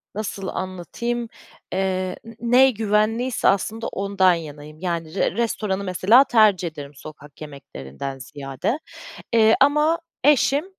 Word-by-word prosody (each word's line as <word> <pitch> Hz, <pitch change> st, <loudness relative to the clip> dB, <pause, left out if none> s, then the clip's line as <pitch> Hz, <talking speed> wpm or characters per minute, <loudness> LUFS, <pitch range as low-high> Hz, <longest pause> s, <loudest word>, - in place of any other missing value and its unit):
nasıl 200 Hz, -2 st, -4 dB
anlatayım, 230 Hz, +6 st, -4 dB, 0.4 s
eee 185 Hz, -1 st, -1 dB
n 230 Hz, 0 st, -12 dB
ne 250 Hz, +3 st, +5 dB
güvenliyse 225 Hz, +3 st, 0 dB
aslında 220 Hz, +3 st, 0 dB
ondan 195 Hz, -2 st, +2 dB
yanayım. 155 Hz, -2 st, -8 dB
Yani, 170 Hz, -2 st, -4 dB
r -, -, +1 dB
restoranı 210 Hz, -4 st, -1 dB
mesela 195 Hz, +7 st, +5 dB
tercih 215 Hz, -9 st, +3 dB
ederim 145 Hz, -2 st, -9 dB
sokak 150 Hz, 0 st, -13 dB
yemeklerinden 135 Hz, -, -8 dB
ziyade. 135 Hz, -, -4 dB, 0.5 s
Eee, 220 Hz, -1 st, +5 dB
ama 300 Hz, +4 st, +3 dB, 0.3 s
eşim, 290 Hz, +1 st, +3 dB
195 Hz, 115 wpm, -22 LUFS, 160-230 Hz, 0.5 s, ne